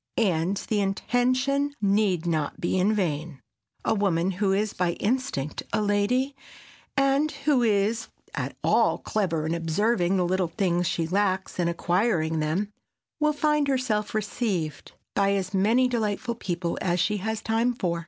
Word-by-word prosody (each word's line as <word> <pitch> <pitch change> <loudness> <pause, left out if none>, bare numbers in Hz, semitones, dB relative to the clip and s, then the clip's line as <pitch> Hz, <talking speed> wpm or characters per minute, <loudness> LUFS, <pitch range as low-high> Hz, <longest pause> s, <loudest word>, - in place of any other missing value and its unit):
And 185 -2 +1
the 210 +1 -1
intention 255 +7 +1
need 200 -4 +2
not 155 -4 -1
be 180 +2 0
in 195 +4 +3
vain. 165 -7 -2 0.5
A - - +3
woman 190 -4 +1
who 195 +1 0
is 205 +2 0
by 175 -1 0
instinct 210 - -2
a - - +1
lady, 215 +7 +1 0.6
and 275 +2 +3
who 280 -3 +1
is 220 0 +1 0.3
at - - -4
all - - +3
clever 170 -7 -1
in 160 - -1
observing 175 +3 +1
the 180 - +2
little 185 0 +1
things 175 -1 0
she 165 - 0
lacks 190 +1 0
and 170 -1 +2
acquiring 170 -2 +1
them, 180 +7 -1 0.5
will 300 0 +3
find 300 -1 +1
herself 235 -6 0
"received" 200 - -2 0.2
by 200 0 +2
as 195 0 -2
many 225 +7 +3
delightful 235 0 -1
people 175 -6 -3
as 175 0 +1
she 210 +4 +1
has 220 +2 -3
time 225 +2 +1
for. 175 -6 -1
200 Hz, 155 wpm, -26 LUFS, 175-230 Hz, 0.6 s, in